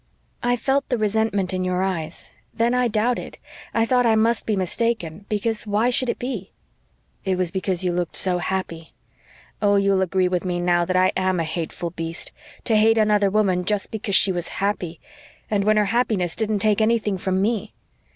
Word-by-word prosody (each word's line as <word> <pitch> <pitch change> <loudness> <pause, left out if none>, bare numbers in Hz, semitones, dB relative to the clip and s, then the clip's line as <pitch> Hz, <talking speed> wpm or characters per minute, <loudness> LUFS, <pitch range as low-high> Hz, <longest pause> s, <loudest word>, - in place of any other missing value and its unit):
"I 245 0 +2
felt 270 +4 0
the 245 - +1
resentment 210 -3 0
in 185 0 -1
your 185 0 0
eyes 170 -4 -4 0.2
then 235 +2 +2
I 250 0 +2
doubted 230 +2 -1 0.3
I 225 0 +2
thought 250 +1 +3
I 225 - +4
must 225 +1 +1
be 215 - +1
mistaken 195 -2 -2
because 215 +1 -1
WHY 215 +4 +2
should 250 0 0
it - - -1
be?" 240 -7 -5 0.7
"It 190 -1 0
was 180 -2 0
because 190 -1 -1
you 180 - +1
looked 175 -2 -2
so 180 -2 +2
happy. 170 -2 -4 0.7
Oh, 205 -1 +3
you'll 195 -1 +3
agree 185 0 +1
with 180 -1 -1
me 180 -1 -2
now 175 0 +2
that 185 +1 0
I 185 0 +4
AM 185 -1 +1
a - - +1
hateful 165 +1 -4
beast 165 0 -5 0.3
to 225 - +2
hate 220 +1 +4
another 210 -2 +3
woman 190 -3 +1
just 205 +2 0
because 210 -2 -1
she 190 - +4
was 175 -2 -2
happy, 185 -4 -2 0.5
and 200 -2 +1
when 215 0 +4
her 210 - +3
happiness 200 -6 0
didn't 215 -3 -1
take 215 0 +3
anything 215 -3 +1
from 190 0 0
me! 215 +1 -1
200 Hz, 190 wpm, -23 LUFS, 180-220 Hz, 0.7 s, I